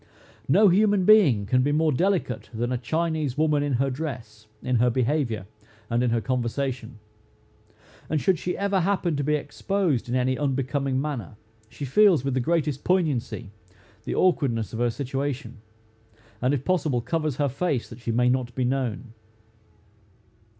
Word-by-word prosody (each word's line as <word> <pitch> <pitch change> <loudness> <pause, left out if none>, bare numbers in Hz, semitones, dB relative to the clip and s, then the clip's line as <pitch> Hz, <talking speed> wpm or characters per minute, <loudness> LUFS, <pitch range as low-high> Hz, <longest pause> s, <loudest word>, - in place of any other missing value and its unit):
No 200 +9 +5
human 200 0 +3
being 165 - +5
can 125 +5 +2
be 145 +3 +1
more 155 +1 +2
delicate 170 - -1
than 120 +1 -2
a 125 - 0
Chinese 155 +1 -1
woman 150 -1 +2
in 145 -1 -1
her 135 +2 +1
dress, 120 -7 -6 0.2
in 125 -1 +1
her 125 +2 +3
behavior, 125 -4 0 0.5
and 120 +1 +2
in 125 - +2
her 115 0 +1
conversation; 125 0 -3 1.1
and 155 - +1
should 185 0 +1
she 180 - -3
ever 200 -1 +1
happen 180 -3 0
to 145 - -1
be 150 +2 +1
exposed 150 - -1
in 125 - -1
any 130 0 0
unbecoming 135 -1 -1
manner, 135 - -4 0.3
she 145 - -6
feels 170 -1 +4
with 135 - 0
the 130 - +1
greatest 150 0 0
poignancy 145 - -1 0.5
the - - -3
awkwardness 130 - +1
of 110 - -4
her 120 0 +2
situation, 135 -1 -4 0.8
and 130 +3 +2
if 135 0 -5
possible, 155 -9 +1
covers 155 +1 -2
her 145 +1 +1
face, 135 -1 -1
that - - -11
she 115 - -3
may 125 +2 +2
not 125 -1 0
be 130 - 0
known. 125 -2 -2
135 Hz, 165 wpm, -25 LUFS, 120-155 Hz, 1.1 s, No